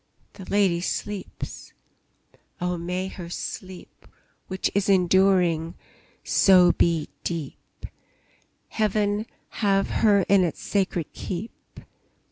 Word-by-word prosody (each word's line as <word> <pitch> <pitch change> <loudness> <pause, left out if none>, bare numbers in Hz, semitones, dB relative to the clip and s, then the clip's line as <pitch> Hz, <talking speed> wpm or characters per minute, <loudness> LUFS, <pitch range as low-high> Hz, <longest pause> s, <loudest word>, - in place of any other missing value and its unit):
The 190 - -11
lady 195 -4 +2
sleeps! 200 +2 -5 0.9
Oh, 180 0 -1
may 180 +2 -3
her 180 -3 -8
sleep 185 +1 -8 0.4
Which 190 0 -2
is 200 0 0
enduring, 180 -3 +3 0.5
so 180 -2 +5
be 165 -4 +1 0.2
deep! 165 -5 -6 0.8
Heaven 210 0 0 0.3
have 195 -2 +2
her 205 -2 +5
in 200 -2 +5
its 170 - -2
sacred 185 -5 -2
keep! 190 +5 -8
185 Hz, 95 wpm, -25 LUFS, 175-200 Hz, 0.9 s, so